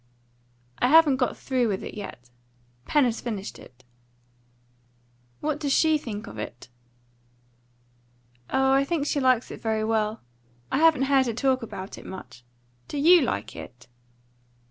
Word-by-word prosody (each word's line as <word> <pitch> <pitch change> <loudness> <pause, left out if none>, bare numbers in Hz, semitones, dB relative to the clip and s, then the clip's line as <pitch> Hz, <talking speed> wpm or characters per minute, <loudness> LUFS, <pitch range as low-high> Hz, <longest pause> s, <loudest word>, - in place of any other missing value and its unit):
"I 245 - +3
haven't 300 -1 +6
got 250 -2 -1
through 255 -3 0
with 195 -3 -2
it - - -7
yet. 125 -12 -9 0.5
Pen 295 - +3
has 235 -2 -1
finished 210 -4 -5
it." 125 0 -17 1.6
"What 300 -1 -1
does 290 -3 -1
she 315 0 +3
think 210 -7 -6
of 105 0 -9
it?" 120 +4 -8 1.8
"Oh, 265 0 +2
I 270 +1 +4
think 290 0 -1
she 290 - 0
likes 255 -3 +2
it - - -9
very 220 -1 -1
well. 220 0 -1 0.5
I - - +1
haven't 320 -4 +5
heard 270 -1 +3
her 235 - -1
talk 260 +2 +1
about 190 -4 -7
it - - -14
much. 130 -10 -10 0.4
Do - - -5
you 335 +4 +6
like 255 - -3
it?" 125 - -11
250 Hz, 150 wpm, -25 LUFS, 210-280 Hz, 1.8 s, haven't